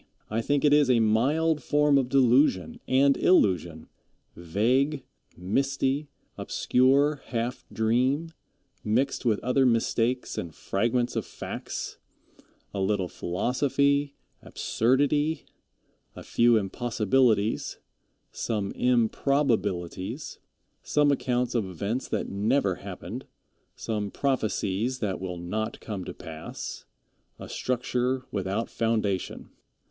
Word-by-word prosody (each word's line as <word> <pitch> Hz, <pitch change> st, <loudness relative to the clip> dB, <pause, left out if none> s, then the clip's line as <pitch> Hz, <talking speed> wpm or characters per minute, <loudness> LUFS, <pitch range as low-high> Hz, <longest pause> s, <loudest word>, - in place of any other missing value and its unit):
I 110 Hz, +2 st, 0 dB
think 145 Hz, +4 st, +1 dB
it 145 Hz, -, +5 dB
is 145 Hz, -3 st, +5 dB
a 125 Hz, -2 st, +5 dB
mild 145 Hz, +9 st, +2 dB
form 145 Hz, -1 st, +3 dB
of 125 Hz, -2 st, -1 dB
delusion 135 Hz, -, +3 dB
and 135 Hz, +1 st, +4 dB
illusion; 85 Hz, -, +2 dB, 0.5 s
vague, 125 Hz, -, +1 dB, 0.3 s
misty, 135 Hz, -, 0 dB, 0.3 s
obscure, 140 Hz, +3 st, +2 dB
half 120 Hz, 0 st, -3 dB
dream, 130 Hz, +8 st, +1 dB, 0.5 s
mixed 125 Hz, +7 st, 0 dB
with 110 Hz, -3 st, +2 dB
other 125 Hz, +2 st, +2 dB
mistakes 120 Hz, 0 st, +1 dB
and 85 Hz, -3 st, -6 dB
fragments 120 Hz, +4 st, 0 dB
of -, -, 0 dB
facts -, -, -6 dB, 0.7 s
a 100 Hz, -, -3 dB
little 95 Hz, -1 st, 0 dB
philosophy, 140 Hz, +9 st, 0 dB, 0.3 s
absurdity 145 Hz, +6 st, +1 dB, 0.7 s
a -, -, -9 dB
few 120 Hz, -1 st, +4 dB
impossibilities 110 Hz, +1 st, +1 dB, 0.5 s
some 105 Hz, -3 st, -2 dB
improbabilities 115 Hz, -, 0 dB, 0.4 s
some 145 Hz, -1 st, +2 dB
accounts 125 Hz, -3 st, 0 dB
of 115 Hz, -4 st, 0 dB
events 100 Hz, +8 st, -3 dB
that -, -, -2 dB
never 100 Hz, 0 st, +1 dB
happened -, -, -8 dB, 0.5 s
some 105 Hz, -2 st, -3 dB
prophecies 115 Hz, -2 st, -1 dB
that 100 Hz, -6 st, -3 dB
will 90 Hz, -2 st, -4 dB
not 105 Hz, +6 st, -3 dB
come 100 Hz, -4 st, -5 dB
to -, -, -6 dB
pass 80 Hz, 0 st, -8 dB, 0.5 s
a -, -, -9 dB
structure 125 Hz, +1 st, -1 dB
without 100 Hz, +3 st, -2 dB
foundation. 110 Hz, -5 st, -2 dB
120 Hz, 105 wpm, -27 LUFS, 105-135 Hz, 0.7 s, it